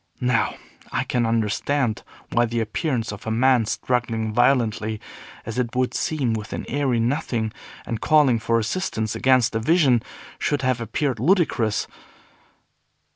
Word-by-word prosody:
Now, 125 -2 +1 0.4
I - - 0
can 120 -2 0
understand 115 +3 0 0.3
why 120 0 +3
the 115 0 -2
appearance 115 +1 -1
of 105 +2 -9
a - - 0
man 120 0 +3
struggling 115 -3 -1
violently, 110 -3 +2 0.5
as 115 +2 -4
it 120 -1 -2
would 130 0 +1
seem, 135 -7 0
with 110 -1 -5
an - - -4
airy 135 -3 0
nothing, 120 -3 -1 0.3
and 115 -2 -4
calling 145 -7 +4
for 115 +1 +1
assistance 110 - -2
against 130 -2 +3
a 115 - 0
vision, 130 -2 +3 0.4
should 145 -2 0
have 130 -2 +1
appeared 120 +2 -1
ludicrous. 135 - +2
120 Hz, 140 wpm, -23 LUFS, 110-130 Hz, 0.5 s, calling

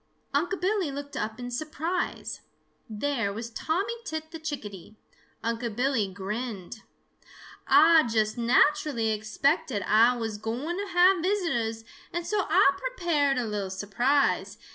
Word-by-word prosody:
Unc' 355 +7 0
Billy 380 -3 0
looked 285 +1 -7
up 220 +2 -3
in 245 0 -6
surprise. 310 +6 -3 0.5
There 225 -1 -1
was 225 +3 -6
Tommy 370 - -1
Tit 315 -5 -5
the 325 - -7
Chickadee. 215 - -7 0.5
Unc' 230 -1 -2
Billy 245 -5 +1
grinned. 210 +2 -5 0.9
"Ah 330 -2 +7
just 215 -1 +1
naturally 240 0 +2
expected 215 - 0
Ah 230 +3 +5
was 220 -2 -4
gwine 255 - -3
to 405 +1 -3
have 360 0 +5
visitors, 320 - -1 0.3
and 345 -1 -3
so 420 0 0
Ah 370 - +5
prepared 335 - 0
a 245 - 0
little 205 -3 -3
surprise. 240 +9 +1
255 Hz, 130 wpm, -27 LUFS, 220-325 Hz, 0.9 s, Ah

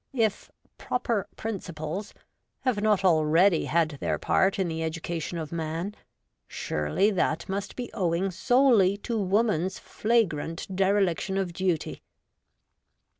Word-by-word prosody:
If 220 -4 0
' - - -38
proper 230 -5 -1
principles 185 -3 -5 0.2
' - - -52
have 240 -6 +1
not 210 -3 +2
already 165 +1 +4
had 160 -3 0
their - - 0
part 190 +1 +2
in 190 -2 0
the 160 -1 -3
education 165 +1 -3
of 155 -2 -5
man, 165 +4 -3 0.5
surely 75 - 0
that 170 -4 0
must 195 +1 -4
be 245 -1 -6
owing 185 -1 0
solely 215 -1 +4
to 230 +3 -4
woman's 195 -2 +1
flagrant 190 -6 -1
dereliction 195 -1 +1
of 190 -3 -1
duty. 180 -3 -1
190 Hz, 125 wpm, -27 LUFS, 165-205 Hz, 0.5 s, already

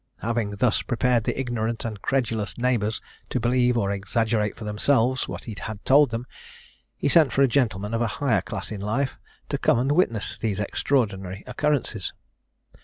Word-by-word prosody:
Having 110 -2 -1
thus 110 +2 +2
prepared 120 -1 +1
the - - -1
ignorant 115 -3 -2
and 105 -3 -5
credulous 115 -6 -1
neighbours 120 -4 0 0.3
to 130 - -1
believe 125 +1 +2
or 100 -3 +1
exaggerate 105 +2 0
for 115 - -8
themselves 125 +4 +2
what - - -6
he 110 - -6
had 110 -2 -7
told 140 +1 +6
them, 115 +2 -4 0.7
he - - -1
sent 145 -2 +5
for 140 - +3
a - - +6
gentleman 110 -5 0
of 115 - 0
a 120 - +2
higher 140 -3 +2
class - - -5
in 105 -2 -5
life, 125 +7 -1 0.3
to - - -1
come - - +3
and 130 +4 +1
witness 130 - +1
these 105 -3 -1
extraordinary 100 -4 -1
occurrences. 125 -6 -1
115 Hz, 175 wpm, -25 LUFS, 105-130 Hz, 0.7 s, told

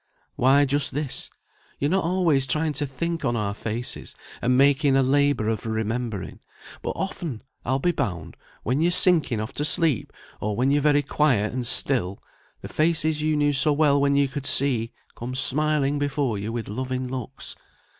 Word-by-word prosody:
"Why, 135 +3 +4
just 140 -1 0
this. 145 -3 -2 0.5
You're 145 +3 0
not 190 0 +2
always 165 -6 +1
trying 155 +1 0
to 145 +1 -1
think 165 +5 -3
on 120 -3 0
our 105 -3 -1
faces, 115 +3 -5 0.3
and 125 +1 +2
making 140 0 +4
a 135 - +4
labour 140 -3 +2
of 110 0 -2
remembering; 110 -2 -3 0.4
but - - -3
often, 170 - -4 0.2
I'll 130 +2 +1
be 175 +6 +1
bound, 85 - -4 0.3
when 130 +6 0
you're 170 - +3
sinking 175 - +3
off 110 +4 -5
to 145 - -3
sleep, 155 - +1 0.3
or 105 0 -2
when 130 +4 +2
you're 145 +1 +2
very 145 0 +3
quiet 135 -8 +1
and 125 -1 -2
still, 110 -7 +1 0.4
the - - -7
faces 155 -1 +1
you 155 0 +1
knew 145 -1 +2
so 145 +2 +3
well 145 -1 +3
when 140 0 +2
you 140 0 +3
could 140 +1 -4
see, 120 -4 +2 0.2
come 125 +2 -6
smiling 145 +1 +1
before 140 -6 -1
you 105 +3 -4
with 115 -2 -4
loving 130 +4 -3
looks. 130 +1 -6
135 Hz, 175 wpm, -24 LUFS, 120-150 Hz, 0.5 s, Why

